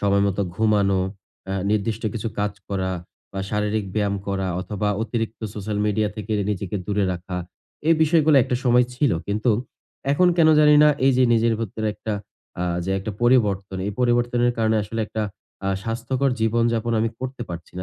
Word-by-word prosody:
সময় 100 Hz, 0 st, +3 dB
মতো 100 Hz, +1 st, 0 dB
ঘুমানো 100 Hz, -2 st, +2 dB, 0.5 s
অ্যা 95 Hz, 0 st, -2 dB
নির্দিষ্ট 110 Hz, +1 st, 0 dB
কিছু 115 Hz, 0 st, -2 dB
কাজ 105 Hz, 0 st, 0 dB, 0.2 s
করা 95 Hz, -2 st, -1 dB, 0.4 s
বা 95 Hz, -, -3 dB
শারীরিক 105 Hz, 0 st, 0 dB
ব্যায়াম 100 Hz, -2 st, +1 dB
করা 95 Hz, -1 st, -1 dB
অথবা 105 Hz, +2 st, -2 dB
অতিরিক্ত 115 Hz, -1 st, -3 dB
সোশ্যাল 105 Hz, 0 st, -3 dB
মিডিয়া 105 Hz, 0 st, +1 dB
থেকে 105 Hz, 0 st, -4 dB, 0.2 s
নিজেকে 100 Hz, 0 st, -3 dB
দূরে 105 Hz, -1 st, +1 dB
রাখা 90 Hz, +1 st, -6 dB, 0.5 s
এই 165 Hz, -, +7 dB
বিষয়গুলো 155 Hz, -2 st, +4 dB
একটা 125 Hz, -1 st, -1 dB
সময় 125 Hz, 0 st, +5 dB
ছিল। 140 Hz, +1 st, +2 dB, 0.2 s
কিন্তু 105 Hz, +4 st, +1 dB, 0.6 s
এখন 180 Hz, +5 st, +4 dB
কেন 160 Hz, -1 st, +6 dB
জানি 150 Hz, 0 st, +6 dB
না 150 Hz, -, +7 dB, 0.2 s
এই 135 Hz, -, +5 dB
যে 130 Hz, -, +4 dB
নিজের 115 Hz, 0 st, +3 dB
ভিতরে 110 Hz, 0 st, -3 dB
একটা 110 Hz, +2 st, -4 dB, 0.5 s
আ -, -, 0 dB, 0.2 s
যে 95 Hz, -, -2 dB
একটা 105 Hz, +3 st, -4 dB
পরিবর্তন। 100 Hz, -6 st, +2 dB
এই 105 Hz, -, -2 dB
পরিবর্তনের 120 Hz, 0 st, +2 dB
কারণে 110 Hz, 0 st, +2 dB
আসলে 110 Hz, +3 st, -4 dB
একটা 110 Hz, -, -3 dB, 0.4 s
আ -, -, +1 dB
স্বাস্থ্যকর 125 Hz, +4 st, -1 dB
জীবনযাপন 115 Hz, +1 st, +1 dB
আমি 115 Hz, -, +1 dB
করতে 130 Hz, -1 st, -5 dB
পারছি 85 Hz, -1 st, -8 dB
না। -, -, -3 dB
110 Hz, 170 wpm, -23 LUFS, 100-120 Hz, 0.6 s, এই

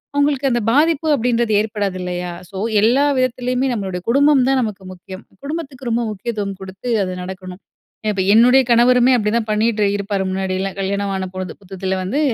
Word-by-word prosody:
அவுங்களுக்கு 285 Hz, -1 st, +2 dB
அந்த 240 Hz, -1 st, +1 dB
பாதிப்பு 315 Hz, +3 st, +2 dB
அப்டின்றது 235 Hz, -3 st, 0 dB
ஏற்படாது 205 Hz, -3 st, -3 dB
இல்லையா? 180 Hz, 0 st, -4 dB, 0.2 s
ஸோ, 195 Hz, -, -8 dB, 0.2 s
எல்லா 245 Hz, +6 st, +4 dB
விதத்திலயுமே 255 Hz, +1 st, 0 dB
நம்மளுடைய 190 Hz, -4 st, -4 dB
குடும்பம் 280 Hz, +1 st, +4 dB
தான் 270 Hz, -, +3 dB
நமக்கு 210 Hz, -4 st, -4 dB
முக்கியம். 185 Hz, +1 st, -11 dB, 0.2 s
குடும்பத்துக்கு 280 Hz, -5 st, -5 dB
ரொம்ப 235 Hz, +1 st, +1 dB
முக்கியத்துவம் 205 Hz, -2 st, -4 dB
கொடுத்து 190 Hz, +5 st, -7 dB
அது 185 Hz, -1 st, -3 dB
நடக்கணும். 185 Hz, 0 st, -8 dB, 0.5 s
இப்ப 195 Hz, -, -1 dB
என்னுடைய 250 Hz, +4 st, +6 dB
கணவருமே 245 Hz, +2 st, +5 dB
அப்டிதான் 225 Hz, 0 st, 0 dB
பண்ணிட்டு 215 Hz, 0 st, +1 dB
இருப்பாரு 200 Hz, -1 st, -2 dB
முன்னாடியெல்லா 190 Hz, 0 st, -2 dB
கல்யாணம் 200 Hz, +1 st, -1 dB
ஆன 190 Hz, 0 st, -2 dB
பொழுது 185 Hz, -2 st, -5 dB
புத்தத்தில 190 Hz, 0 st, -4 dB
வந்து 200 Hz, +10 st, -2 dB
215 Hz, 155 wpm, -19 LUFS, 190-250 Hz, 0.5 s, என்னுடைய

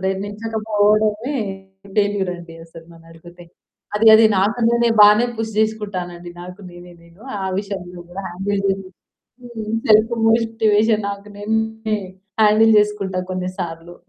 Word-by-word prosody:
ప్రయత్నించకపోవడమే 210 Hz, +4 st, 0 dB, 0.6 s
ఫెయిల్యూరండసలు 175 Hz, -5 st, -3 dB
నన్నడిగితే. 165 Hz, +1 st, -15 dB, 0.5 s
అది, 220 Hz, +2 st, +2 dB
అది 220 Hz, 0 st, +7 dB
నాకు 210 Hz, +5 st, +1 dB
నేనే 235 Hz, 0 st, +2 dB
బానే 210 Hz, +3 st, +7 dB
పుష్ 225 Hz, -1 st, -4 dB
చేసుకుంటానండి. 185 Hz, -5 st, -3 dB
నాకు 180 Hz, +3 st, -10 dB
నేనే, 175 Hz, 0 st, -13 dB
నేను. 170 Hz, +4 st, -21 dB, 0.2 s
ఆ 190 Hz, -, -2 dB
విషయంలో 190 Hz, -3 st, -6 dB
గూడా 185 Hz, +3 st, -7 dB
హ్యాండిల్ 195 Hz, +3 st, -3 dB
చేస్తూ 195 Hz, -1 st, -2 dB, 1.0 s
సెల్ఫ్ 215 Hz, +2 st, +5 dB, 0.2 s
మోటివేషన్ 225 Hz, -2 st, +2 dB
నాకు 200 Hz, +1 st, -8 dB
నేనే 220 Hz, +1 st, -2 dB, 0.4 s
హ్యాండిల్ 220 Hz, +1 st, +5 dB
చేసుకుంటా 210 Hz, -3 st, -1 dB
కొన్ని 185 Hz, 0 st, -3 dB
సార్లు. 170 Hz, -1 st, -6 dB
205 Hz, 110 wpm, -20 LUFS, 180-220 Hz, 1.0 s, అది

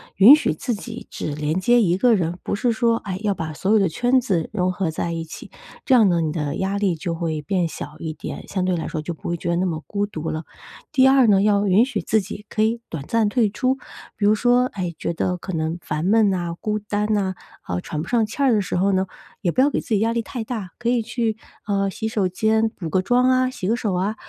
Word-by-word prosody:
允 230 Hz, +10 st, +9 dB
许 -, -, 0 dB
自 245 Hz, -, -3 dB
己 200 Hz, -, -8 dB
只 150 Hz, -, -4 dB
连 150 Hz, +4 st, -1 dB
接 240 Hz, +5 st, +4 dB
一 180 Hz, -2 st, +2 dB
个 240 Hz, +1 st, +4 dB
人， 175 Hz, -2 st, -1 dB
不 -, -, -2 dB
是 235 Hz, +3 st, +1 dB
说， 230 Hz, 0 st, +2 dB
哎， 190 Hz, -4 st, -5 dB
要 205 Hz, -1 st, +2 dB
把 160 Hz, -3 st, -5 dB
所 190 Hz, +7 st, -1 dB
有 220 Hz, -, +5 dB
的 195 Hz, -, +3 dB
圈 245 Hz, +10 st, +2 dB
子 180 Hz, -9 st, -1 dB
融 185 Hz, -3 st, +1 dB
合 185 Hz, -2 st, -2 dB
在 170 Hz, +2 st, -3 dB
一 165 Hz, 0 st, -3 dB
起。 160 Hz, -, -10 dB, 0.3 s
这 265 Hz, -, +3 dB
样 220 Hz, -4 st, +6 dB
呢， 170 Hz, -1 st, +2 dB
你 155 Hz, -1 st, -1 dB
的 150 Hz, -2 st, -2 dB
压 195 Hz, +1 st, -1 dB
力 195 Hz, -4 st, +1 dB
就 170 Hz, +2 st, -3 dB
会 160 Hz, -2 st, -2 dB
变 175 Hz, +3 st, 0 dB
小 150 Hz, -1 st, -8 dB
一 160 Hz, -1 st, -4 dB
点， 155 Hz, -, -7 dB
相 185 Hz, -2 st, -2 dB
对 185 Hz, -1 st, +1 dB
来 165 Hz, -, -3 dB
说 155 Hz, -, -3 dB
就 170 Hz, +3 st, -4 dB
不 160 Hz, -, -9 dB
会 170 Hz, -, -1 dB
觉 170 Hz, -, -4 dB
得 170 Hz, -, +2 dB
那 185 Hz, -, +1 dB
么 160 Hz, -3 st, -2 dB
孤 205 Hz, 0 st, -1 dB
独 160 Hz, -5 st, -5 dB
了。 155 Hz, +1 st, -4 dB, 0.5 s
第 265 Hz, -2 st, +5 dB
二 265 Hz, -2 st, +5 dB
呢， 195 Hz, -2 st, +5 dB
要 205 Hz, 0 st, +3 dB
允 200 Hz, +6 st, +5 dB
许 275 Hz, -, -3 dB
自 220 Hz, -1 st, +1 dB
己 210 Hz, +2 st, -8 dB
可 215 Hz, -, -1 dB
以 230 Hz, +2 st, 0 dB
短 160 Hz, -4 st, -5 dB
暂 230 Hz, -2 st, +2 dB
退 225 Hz, -3 st, +2 dB
出， 255 Hz, +4 st, 0 dB, 0.4 s
比 205 Hz, -, -1 dB
如 210 Hz, -, +5 dB
说， 245 Hz, +2 st, +3 dB
哎， 180 Hz, -6 st, -4 dB
觉 -, -, -2 dB
得 180 Hz, +2 st, -1 dB
可 190 Hz, +1 st, -7 dB
能 160 Hz, +1 st, -1 dB
烦 155 Hz, +3 st, -3 dB
闷 215 Hz, 0 st, +4 dB
呐， 175 Hz, -3 st, -2 dB
孤 215 Hz, 0 st, -1 dB
单 210 Hz, +1 st, -2 dB
呐， 190 Hz, -3 st, 0 dB, 0.3 s
好 90 Hz, 0 st, -3 dB
喘 150 Hz, -, -4 dB
不 -, -, -7 dB
上 235 Hz, -2 st, +2 dB
气 225 Hz, +6 st, -6 dB
儿 270 Hz, -3 st, +4 dB
的 210 Hz, -, +3 dB
时 185 Hz, -, -2 dB
候 195 Hz, +3 st, +2 dB
呢， 190 Hz, 0 st, +2 dB, 0.4 s
也 180 Hz, -5 st, +1 dB
不 255 Hz, -, -2 dB
要 285 Hz, -, +5 dB
给 -, -, -1 dB
自 -, -, -16 dB
己 215 Hz, -3 st, +2 dB
压 225 Hz, +1 st, +1 dB
力 235 Hz, -, 0 dB
太 225 Hz, +1 st, -5 dB
大。 215 Hz, -6 st, -5 dB
可 240 Hz, -1 st, -1 dB
以 240 Hz, -1 st, +2 dB
去， 225 Hz, -1 st, -2 dB, 0.3 s
呃， 195 Hz, -1 st, +1 dB
洗 220 Hz, +4 st, -4 dB
手 210 Hz, -4 st, 0 dB
间 220 Hz, +4 st, +1 dB
补 175 Hz, -7 st, -7 dB
个 185 Hz, +4 st, +2 dB
妆 250 Hz, +5 st, +3 dB
啊， 255 Hz, 0 st, +3 dB
洗 185 Hz, -7 st, -5 dB
个 225 Hz, -, +2 dB
手 215 Hz, -5 st, -2 dB
啊， 195 Hz, +4 st, -1 dB
200 Hz, 285 characters per minute, -22 LUFS, 170-225 Hz, 0.5 s, 允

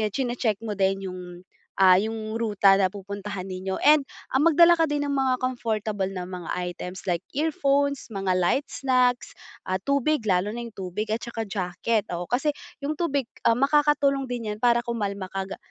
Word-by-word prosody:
chine-check 240 Hz, -5 st, -1 dB
mo 210 Hz, -3 st, -4 dB
din 195 Hz, -1 st, 0 dB
'yung 180 Hz, 0 st, -7 dB, 0.6 s
ah, 190 Hz, -1 st, +7 dB
'yung 215 Hz, +2 st, -1 dB
ruta 205 Hz, -3 st, +4 dB
na 195 Hz, -1 st, +3 dB
pupuntahan 200 Hz, 0 st, -6 dB
ninyo. 190 Hz, 0 st, -4 dB
And 300 Hz, 0 st, +7 dB, 0.3 s
ah, 265 Hz, -, +3 dB
magdala 335 Hz, +2 st, +6 dB
ka 325 Hz, -2 st, +2 dB
din 290 Hz, 0 st, 0 dB
ng 285 Hz, -, -1 dB
mga 265 Hz, -2 st, +1 dB
comfortable 220 Hz, -6 st, -2 dB
na 185 Hz, -2 st, -5 dB
mga 180 Hz, -2 st, -7 dB
items 180 Hz, +1 st, -5 dB
like 175 Hz, -2 st, 0 dB, 0.2 s
earphones, 280 Hz, -3 st, +1 dB
mga 195 Hz, -3 st, -1 dB
light 185 Hz, +10 st, +1 dB
snacks, 250 Hz, -1 st, +1 dB, 0.4 s
ah, 185 Hz, -, +1 dB
tubig. 280 Hz, -2 st, +1 dB
Lalo 190 Hz, 0 st, +2 dB
na 235 Hz, +2 st, -5 dB
yung 230 Hz, -, -10 dB
tubig 190 Hz, +3 st, -4 dB
at 230 Hz, -, -2 dB
saka 230 Hz, -2 st, -4 dB
jacket. 200 Hz, +2 st, -1 dB
Oo, 175 Hz, -, -4 dB
kasi 255 Hz, -, 0 dB, 0.3 s
'yung 295 Hz, +2 st, -3 dB
tubig, 280 Hz, -7 st, -1 dB, 0.2 s
makakatulong 275 Hz, +2 st, +3 dB
din 240 Hz, -4 st, -4 dB
'yan 210 Hz, -, -9 dB
para 240 Hz, +1 st, +3 dB
kumalma 200 Hz, -5 st, -3 dB
ka 195 Hz, 0 st, -3 dB
ga 195 Hz, -, -7 dB
220 Hz, 175 wpm, -25 LUFS, 195-270 Hz, 0.6 s, ah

